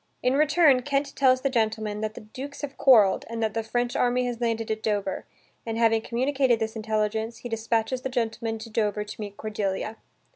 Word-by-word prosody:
In 250 - +3
return 300 -2 +4
Kent 280 +2 -1
tells 260 -2 +4
the 275 - +1
gentleman 220 -3 -1
that 215 0 -3
the - - -8
dukes 265 +7 -8
have 285 -2 -5
quarrelled, 215 -8 +5
and 230 0 -3
that 215 -1 0
the 225 - -1
French 240 +2 -2
army 250 0 +2
has 245 -1 -4
landed 225 -1 -1
at 220 0 -2
Dover, 205 -3 -2 0.4
and, 225 -1 -4
having 225 -1 +3
communicated 255 +1 +1
this 220 0 -3
intelligence, 220 +1 -1
he 245 - -8
dispatches 225 +2 -1
the 265 - -3
gentleman 230 -2 -2
to 220 +1 -10
Dover 210 -1 0
to 210 +1 -9
meet 205 -1 -7
Cordelia. 210 0 -3
225 Hz, 195 wpm, -26 LUFS, 220-250 Hz, 0.4 s, quarrelled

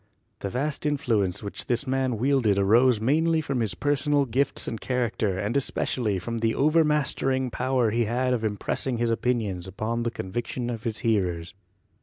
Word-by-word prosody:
The 100 - -3
vast 145 +7 -2
influence 110 -11 0
which 100 - -6
this 125 +2 0
man 130 -2 0
wielded 125 -4 +2
arose 115 +4 +4
mainly 160 +8 +2
from 140 -4 -2
his 110 -3 -1
personal 145 0 +1
gifts 130 +3 -1
and 115 - -4
character 115 -6 -1
and 105 +5 -2
especially 120 -5 0
from 115 +6 -4
the 115 0 +1
overmastering 145 -4 +2
power 125 -2 +1
he 115 +1 +1
had 125 +3 0
of 115 -3 -1
im 105 -2 -1
pressing 125 +4 -2
his 120 0 +1
opinions 110 -7 -1
upon 110 +5 -2
the 120 - 0
convictions 120 +4 -4
of 115 -2 -6
his 110 -2 -2
hearers. 90 -6 0
120 Hz, 170 wpm, -26 LUFS, 110-135 Hz, -, arose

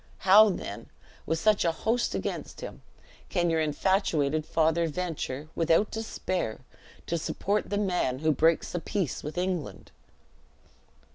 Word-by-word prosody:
How, 210 +3 +8
then, 185 - -5 0.4
with 160 - +1
such 215 +4 +3
a 170 - +2
host 225 +8 -1
against - - -4
him, - - -8 0.5
can 175 -2 +1
your 160 -1 +2
infatuated 155 -2 +1
father 165 +1 +2
venture, 155 -4 -4
without 165 +5 +2
despair, 185 - -3 0.4
to 170 - -1
support 205 +6 -1
the 205 - -1
man 180 -10 0
who 155 +3 +2
breaks 160 +3 +2
the 175 - -2
peace 180 - -2
with 150 +4 -7
England?" 180 -4 -3
170 Hz, 135 wpm, -28 LUFS, 155-195 Hz, 0.5 s, How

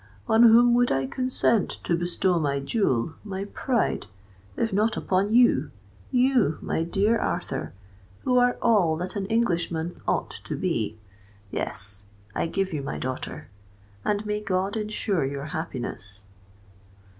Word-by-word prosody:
On 220 +1 +4
whom 240 +1 +7
would 245 0 +3
I 135 0 +1
consent 235 - +1
to 170 - +1
bestow 175 +1 +1
my 140 -3 0
jewel, 140 - 0
my 195 -2 -4
pride, 235 +3 -1 0.5
if 225 -3 0
not 215 +3 +2
upon 190 +2 +1
you—you, 155 - +2
my - - -2
dear 205 +6 +2
Arthur, - - -2 0.5
who 250 -1 +3
are 245 0 +3
all 190 -9 +4
that 180 +4 -5
an 195 -2 -2
Englishman 175 -7 0
ought - - 0
to - - -3
be? 115 - -1 0.5
Yes—I 100 - -3
give 190 +1 -1
you 150 - -2
my 140 - -4
daughter; 130 0 -5 0.5
and 210 0 0
may 210 0 -1
God 195 0 -1
ensure 210 -5 -1
your 140 +1 -3
happiness!" 120 - -3
185 Hz, 135 wpm, -26 LUFS, 140-220 Hz, 0.5 s, whom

